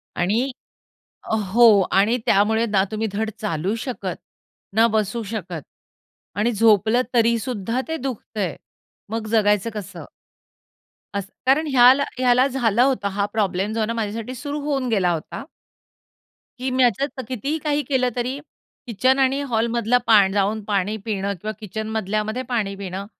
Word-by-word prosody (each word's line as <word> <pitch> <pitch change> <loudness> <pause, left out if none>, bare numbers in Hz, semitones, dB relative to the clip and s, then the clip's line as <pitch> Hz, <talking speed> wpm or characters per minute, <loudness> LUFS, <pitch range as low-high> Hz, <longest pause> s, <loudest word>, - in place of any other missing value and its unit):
आणि 220 +10 0 1.0
हो 240 +2 +7 0.3
आणि 215 +5 +3
त्यामुळे 220 +3 +3
ना 205 -3 +2
तुम्ही 220 +1 -2
धड 220 +2 -2
चालू 190 -1 -1
शकत, 255 -3 -4 0.6
ना 225 +1 +6
बसू 215 +2 -1
शकत 180 -7 -5 0.8
आणि 230 +4 +2
झोपलं 220 +2 +4
तरीसुद्धा 230 0 +1
ते 320 - -2
दुखतंय. 225 - -4 0.5
मग 225 0 -3
जगायचं 210 -1 +2
कसं? 210 -3 -7 1.1
अस 200 -2 -2 0.2
कारण 285 +5 +3
ह्याला 260 +2 +6
ह्याला 250 0 +4
झालं 240 -4 +1
होतं 260 -6 +1
हा 200 - +2
प्रॉब्लेम 200 -1 0
जो 225 - -2
आहे 220 - +2
ना 230 - -2
माझ्यासाठी 225 +2 -4
सुरु 285 +4 -4
होऊन 280 -3 -1
गेला 190 -6 +2
होता. 165 +8 -5 1.2
की 260 +1 -2
मी 255 0 +3
याचातलं 260 +4 0
कितीही 270 +5 -2
काही 295 -1 0
केलं 260 -3 +1
तरी 250 +3 -2 0.5
किचन 255 +4 +2
आणि 270 +1 +2
हॉलमधला 235 +1 +1
पा 210 -4 +6
जाऊन 205 +1 0
पाणी 205 0 0
पिणं 200 -2 -2
किंवा 215 - -3
किचन 220 0 -5
मधल्यामध्ये 215 +2 -2
पाणी 210 -5 -1
पिणं 195 0 -6
225 Hz, 140 wpm, -22 LUFS, 205-255 Hz, 1.2 s, हो